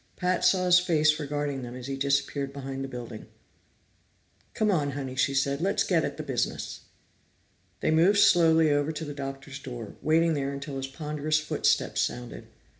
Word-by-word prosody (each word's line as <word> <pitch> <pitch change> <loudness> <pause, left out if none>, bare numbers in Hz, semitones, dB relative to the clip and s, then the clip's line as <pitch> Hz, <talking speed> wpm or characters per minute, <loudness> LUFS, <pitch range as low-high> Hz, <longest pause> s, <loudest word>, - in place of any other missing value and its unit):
Pat 180 0 0
saw 185 -1 +3
his 180 0 +6
face 155 -4 +2
regarding 145 -2 -3
them 120 0 -7
as 125 -1 -8
he 135 0 -3
disappeared 140 0 0
behind 135 -1 -6
the - - -4
building. 120 -4 -8 1.3
"Come 215 -1 +2
on, 145 -6 0
Honey," 135 -2 -5
she 135 +1 +1
said. 140 +2 0
"Let's 195 +3 +1
get 165 -4 +1
at - - -3
the - - -4
business." - - -3 1.0
They - - +1
moved 175 +6 +4
slowly 160 -5 +5
over 145 +1 +1
to 160 0 -5
the 145 - -6
Doctor's 135 0 -7
door, 120 -6 -8
waiting 165 +1 +3
there 140 -1 -2
until 140 0 -6
his 135 0 -3
ponderous 150 +1 -1
footsteps 155 - +1
sounded. 120 0 -4
145 Hz, 175 wpm, -27 LUFS, 135-160 Hz, 1.3 s, his